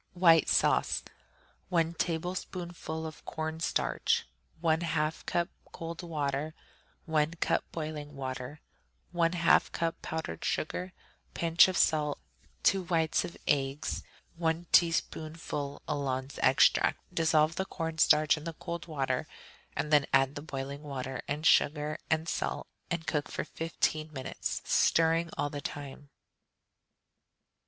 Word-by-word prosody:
White 165 -3 +6
Sauce - - +3 0.7
1 165 -2 +2
tablespoonful 170 -1 -3
of 155 -1 -8
corn 160 0 -4
starch. 165 - +1 0.4
1/2 160 -1 +1
cup 175 0 +1 0.2
cold 165 +1 -6
water. 150 -2 -2 0.5
1 160 0 +1
cup - - +1
boiling 155 -2 -5
water. 130 +2 -5 0.5
1/2 170 0 +3
cup 165 -1 -2
powdered 160 0 -4
sugar. 180 +4 -2 0.4
Pinch 165 +1 +6
of 185 -1 -1
salt. 150 -2 +2 0.5
2 195 - +4
whites 165 -2 +2
of 170 - -7
eggs. 140 0 0 0.4
1 165 0 0
teaspoonful 155 -3 +1
alons 135 -1 -2
extract. 130 - +5 0.2
Dissolve 160 -1 +3
the 190 - -2
corn 165 -3 -4
starch 155 -1 +5
in 150 - -8
the 165 0 -4
cold 170 +2 -6
water, 135 -5 -1 0.5
and 150 - -1
then 145 -2 +5
add 135 0 +4
the 145 - -6
boiling 140 -1 -5
water 135 -3 -5
and 150 +3 -3
sugar 150 -1 +3
and 160 +1 +1
salt, - - -2 0.2
and 170 -2 -2
cook 150 -1 -1
for - - -3
fifteen 155 -1 -2
minutes, 130 -3 -4
stirring 165 +1 +3
all 145 0 -1
the 145 - -5
time. 145 0 -7
160 Hz, 125 wpm, -30 LUFS, 145-165 Hz, 0.7 s, White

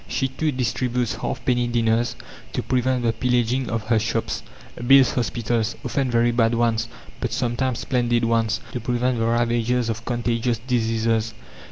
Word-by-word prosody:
She, 135 - -1
too, 150 +4 -1
distributes 125 -1 -1
halfpenny 120 -1 -1
dinners 115 0 +1 0.4
to - - -2
prevent 130 0 0
the 115 -1 +2
pillaging 125 +1 0
of 115 0 -2
her 110 0 +2
shops; 115 +1 -2 0.5
builds 135 0 +7
hospitals 120 -2 -1
often 135 -2 0
very 120 0 +3
bad 115 -1 +2
ones, 115 -1 +1 0.3
but - - -2
sometimes 125 +1 -1
splendid 120 -2 +1
ones 115 -1 +1
to 125 - -3
prevent 120 +1 0
the 115 - +1
ravages 120 +1 +1
of 115 0 -3
contagious 120 -1 -1
diseases. 115 -2 0
120 Hz, 150 wpm, -23 LUFS, 115-125 Hz, 0.5 s, builds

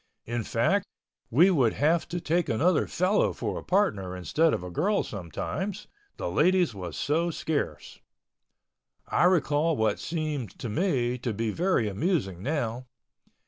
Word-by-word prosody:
In 120 0 -2
fact, - - +1 0.5
we 175 +10 +5
would 130 -10 +3
have 160 +4 +2
to 175 - -3
take 170 +1 0
another 160 +10 +2
fellow 185 +4 +1
for - - -3
a - - -11
partner 100 - 0
instead 155 - +2
of 90 - -2
a 90 - -7
girl 200 - +1
sometimes—the 195 - -6
ladies 180 -3 +3
was 90 -7 -6
so 165 +4 +1
scarce. 160 -2 -3 1.1
I - - +2
recall 160 -3 +2
what 110 -2 +1
seems 150 - -3
to 120 - -6
me 125 - 0
to 120 -2 -2
be 110 0 -1
very 170 - +1
amusing 100 - -1
now. 125 -2 -2
150 Hz, 145 wpm, -27 LUFS, 110-175 Hz, 1.1 s, we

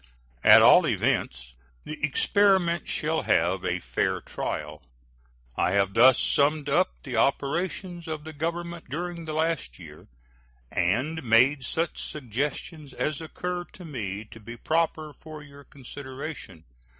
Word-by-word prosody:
At - - +9
all - - +7
events, 65 0 -1 0.3
the 155 0 -8
experiment 175 +2 +2
shall 160 +1 0
have 90 +3 +1
a 90 -1 0
fair - - -1
trial. 75 0 -5 0.7
I 90 - +1
have 100 -1 +2
thus 125 +3 +6
hastily - - +1
summed 145 0 +2
up 180 +6 0
the 125 -4 -4
operations 170 - -1
of 155 -2 -5
the 160 0 -9
Government 170 +1 -4
during 170 +3 -5
the 155 - -5
last 155 - -1
year, - - -13 0.6
and 130 - 0
made 130 +3 +4
such 165 +6 -2
suggestions 145 - -5
as 155 +3 -2
occur 180 +2 -4
to 180 - -11
me 110 - -5
to 115 - -11
be 120 +2 -10
proper 155 +1 -1
for 155 -1 -11
your 145 0 -14
consideration. 130 - -9
150 Hz, 140 wpm, -26 LUFS, 120-165 Hz, 0.7 s, At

